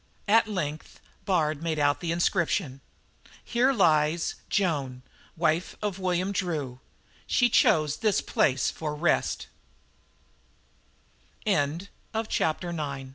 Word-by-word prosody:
At 225 +2 +5
length 155 -7 -4 0.3
Bard 155 -5 +1
made 165 -2 -1
out 145 -1 +2
this 170 - -3
inscription: 170 -4 0 0.6
HERE 245 +3 +2
SLEEPS 160 - +2 0.2
JOAN 140 -10 -1 0.3
WIFE 165 +1 0
OF 205 -3 -3
WILLIAM 185 +1 0
DREW 150 -10 -3 0.5
SHE 245 -1 +3
CHOSE 155 -7 +3
THIS 215 -3 +2
PLACE 130 -2 +1
FOR 150 -2 -4
REST 160 +2 0 2.0
CHAPTER 155 +7 0 0.8
X 170 -2 -4
A 140 -3 -5
165 Hz, 105 wpm, -27 LUFS, 145-185 Hz, 2.0 s, At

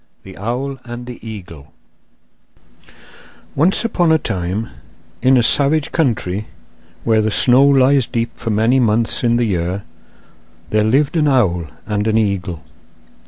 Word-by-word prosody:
] - - -43
The 95 -1 -12
Owl 130 +6 -4
and 120 0 -8
the 125 -1 -9
Eagle 90 -10 -10 1.8
Once 175 +10 +1
upon 175 -7 +1
a 160 - +5
time, 100 - -3 0.5
in 130 0 +4
a 120 - +3
savage 145 +4 +3
country 110 - -1 0.6
where 110 -1 +2
the 110 - 0
snow 125 +5 +4
lies 135 -2 +3
deep 115 0 -2
for 115 - -5
many 110 +5 +2
months 115 0 0
in 120 -1 +2
the 120 0 +1
year, 90 0 -2 0.9
there 110 0 +2
lived 135 +8 +1
an 150 -2 +2
owl 95 - +1 0.2
and 105 0 -2
an 110 0 +2
eagle. 95 -6 -2
115 Hz, 145 wpm, -17 LUFS, 105-135 Hz, 1.8 s, a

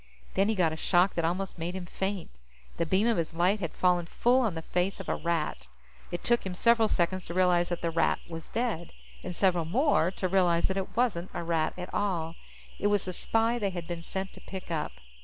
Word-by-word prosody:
Then 195 +2 +2
he 220 - +1
got 170 -5 +2
a - - -3
shock 180 +3 +3
that 170 - -1
almost 180 +2 -2
made 175 +3 -3
him 185 -2 -4
faint. 190 +1 -3 0.5
The 170 - 0
beam 190 +6 +3
of 235 -2 +3
his 165 -1 -2
light 185 +5 +3
had 170 -5 -3
fallen 180 -2 +2
full 245 +7 +3
on 220 -8 0
the 160 - -5
face 180 +4 -1
of - - -7
a - - +1
Rat. 160 - -2 0.4
It 175 - -5
took 240 0 +2
him 185 -2 -4
several 230 +2 +4
seconds 185 -1 0
to 170 - -6
realize 180 -1 +3
that 175 -1 -3
the 170 - +1
Rat 165 - +2
was 165 -1 -8
dead, 225 -8 -2 0.3
and 180 -1 -6
several 175 -4 +2
more 235 - +3
to 185 0 -2
realize 175 -2 +3
that 190 - -1
it 190 +3 -4
wasn't 200 -8 +1
a - - -2
Rat 165 -2 0
at 180 0 -7
all. 170 -5 -1 0.5
It 205 - +2
was 205 -1 +2
the 185 - -3
spy 225 +6 +1
they 200 -3 0
had 175 -3 -5
been 170 0 -5
sent 190 +3 -4
to - - -13
pick 190 -2 -8
up. 155 -2 -2
180 Hz, 230 wpm, -29 LUFS, 170-195 Hz, 0.5 s, several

